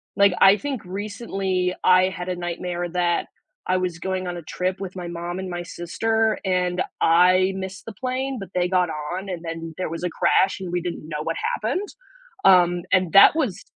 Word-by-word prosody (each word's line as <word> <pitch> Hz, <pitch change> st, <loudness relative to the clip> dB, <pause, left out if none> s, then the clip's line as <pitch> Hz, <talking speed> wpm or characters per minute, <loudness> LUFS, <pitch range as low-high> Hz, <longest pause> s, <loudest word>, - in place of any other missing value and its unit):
like, 200 Hz, -1 st, +5 dB
I 195 Hz, +2 st, +8 dB
think 275 Hz, -3 st, -4 dB
recently, 195 Hz, -2 st, -2 dB
I 185 Hz, 0 st, +6 dB
had 180 Hz, -1 st, -6 dB
a 180 Hz, -, -1 dB
nightmare 175 Hz, 0 st, -4 dB
that 175 Hz, -1 st, 0 dB, 0.4 s
I 185 Hz, 0 st, +2 dB
was 180 Hz, -2 st, -2 dB
going 185 Hz, 0 st, -3 dB
on 175 Hz, -, -4 dB
a -, -, -6 dB
trip 185 Hz, +4 st, -3 dB
with 190 Hz, -1 st, -6 dB
my 180 Hz, -1 st, -5 dB
mom 175 Hz, +1 st, -5 dB
and 190 Hz, -1 st, -5 dB
my 175 Hz, 0 st, -4 dB
sister 220 Hz, +6 st, -1 dB
and 180 Hz, -1 st, 0 dB, 0.2 s
I 185 Hz, +3 st, +5 dB
missed 190 Hz, 0 st, -6 dB
the -, -, -6 dB
plane, 260 Hz, +4 st, -3 dB
but 195 Hz, -2 st, -8 dB
they 180 Hz, 0 st, +1 dB
got 180 Hz, -2 st, +2 dB, 0.2 s
on 190 Hz, +2 st, -5 dB
and 175 Hz, -2 st, -5 dB
then 165 Hz, -1 st, -6 dB
there 185 Hz, -, -3 dB
was 165 Hz, +2 st, -6 dB
a 180 Hz, -, 0 dB
crash 190 Hz, +3 st, +2 dB
and 180 Hz, -2 st, -5 dB
we 175 Hz, 0 st, -1 dB
didn't 175 Hz, -3 st, -5 dB
know 150 Hz, -1 st, -3 dB
what -, -, -2 dB, 0.2 s
happened. 405 Hz, -2 st, -2 dB, 0.6 s
Um, 175 Hz, -2 st, +5 dB
and 185 Hz, -2 st, +3 dB
that 200 Hz, +9 st, +8 dB
was 255 Hz, -, -1 dB
185 Hz, 200 wpm, -23 LUFS, 175-195 Hz, 0.6 s, I